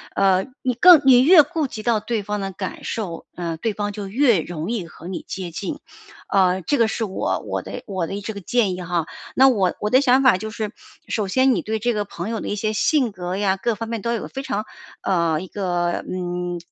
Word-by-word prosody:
呃 190 -1 +3 0.2
你 255 -1 0
更 340 +5 +8
你 250 -2 +7
越 310 +2 +8
顾 300 0 -2
及 215 -3 -8
到 230 -3 +2
对 220 -1 -2
方 210 +1 -3
的 195 -1 -3
感 190 0 -6
受， 180 -7 -4
嗯， 170 -2 -4
对 225 -2 0
方 205 0 -3
就 205 -1 -6
越 235 -1 +3
容 170 +5 -5
易 195 -8 -3
和 170 +2 -11
你 185 - -4
接 185 -3 -5
近。 200 - -5 0.5
啊， 185 -1 +2
这 285 - 0
个 230 -1 +4
是 225 - -2
我 195 -3 -1
我 - - -3
的 - - -8
我 185 -5 -2
的 200 +1 -5
这 220 - -4
个 200 - -7
建 205 0 +1
议 180 - -7
哈。 170 -2 -1 0.3
那 265 +1 +7
我 195 -7 +1
我 210 - 0
的 255 +4 +5
想 265 0 +4
法 250 -8 +6
就 220 +3 -5
是 215 -1 -4 0.4
首 210 -3 -1
先 260 +6 +3
你 180 - 0
对 220 +4 -2
这 240 +3 0
个 210 -1 -1
朋 195 +1 -6
友 225 -1 -2
的 - - -6
一 205 - -2
些 215 +1 -1
性 245 +2 +2
格 180 0 -5
呀， 195 -1 +1
各 230 +3 -1
方 225 +2 -6
面 230 -2 -3
都 235 +3 -1
有 230 - -4
非 270 0 -6
常， 215 -5 -2 0.4
呃， 170 -4 +1
一 185 - -7
个， 175 -3 -1
嗯， 180 -1 -3
205 Hz, 255 characters per minute, -22 LUFS, 185-235 Hz, 0.5 s, 更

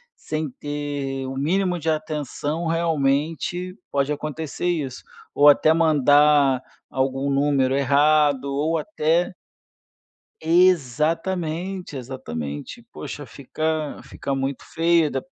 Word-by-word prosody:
sem 155 -1 -4
ter 145 -2 -4
o 135 - -5
mínimo 180 +5 0
de 160 - -2
atenção, 155 +1 -2
realmente, 165 +2 0 0.2
pode 140 +1 0
acontecer 155 +3 -4
isso, 145 -7 -2 0.3
ou 145 +1 +7
até 155 +2 +5
mandar 145 -3 +4 0.3
algum 135 +1 -1
número 135 -2 +2
errado 145 0 +3
ou 155 +4 0
até 165 +1 0 1.1
Exatamente, 170 +2 +1
exatamente. 80 - -6
Poxa, 145 -2 -7
fica 155 +2 -3
fica 140 - -5
muito 135 0 -2
feia 165 -2 +2
da 135 - -2
150 Hz, 100 wpm, -23 LUFS, 140-165 Hz, 1.1 s, ou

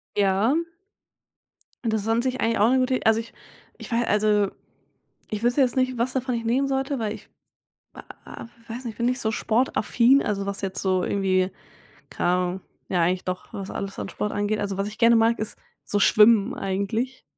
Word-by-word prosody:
Ja. 205 +6 +2 1.3
Das 220 -2 0
ist 205 - -6
an 225 +1 +2
sich 255 +1 -2
auch 225 -1 +3
'ne 260 +1 +3
gute 255 0 +1
Id - - -4
also, 220 0 +4
ich 230 - -13 0.4
ich - - -10
wei 235 +1 +1
also 210 -1 +2 0.8
ich 210 +1 -3
wüsste 245 +4 +2
jetzt 255 -2 +2
nicht, 255 -1 +1
was 240 +2 0
davon 255 -1 -1
ich 230 - -3
nehmen 260 +4 +1
sollte, 270 0 -1
weil 215 -2 -2
ich 215 - -12 0.6
w - - -10 0.2
w - - -9 0.3
weiß 250 +2 -7
nicht 230 - -4
ich - - -25
bin 235 - -1
nicht 250 +1 0
so 220 - 0
sportaffin 240 +3 +2
also 200 -2 -2
was 200 0 -2
jetzt 195 -1 -2
so 185 -2 +1
irgendwie 190 -1 +1 0.6
keine - - -1
Ahnung 180 +1 0 0.3
ja 180 - +1
eigentlich 180 +2 0
doch, 185 0 -5
was 195 -1 -6
alles 195 0 -5
an - - -5
Sport 210 - -3
angeht. 205 +1 -1
Also 200 -1 -2
was 195 +1 -1
ich 210 - -8
gerne 235 0 +6
mag, 230 +1 +3
ist 215 - -3 0.3
so 205 - 0
Schwimmen 210 0 +5
eigentlich. 200 +7 -3
220 Hz, 200 wpm, -24 LUFS, 200-240 Hz, 1.3 s, gerne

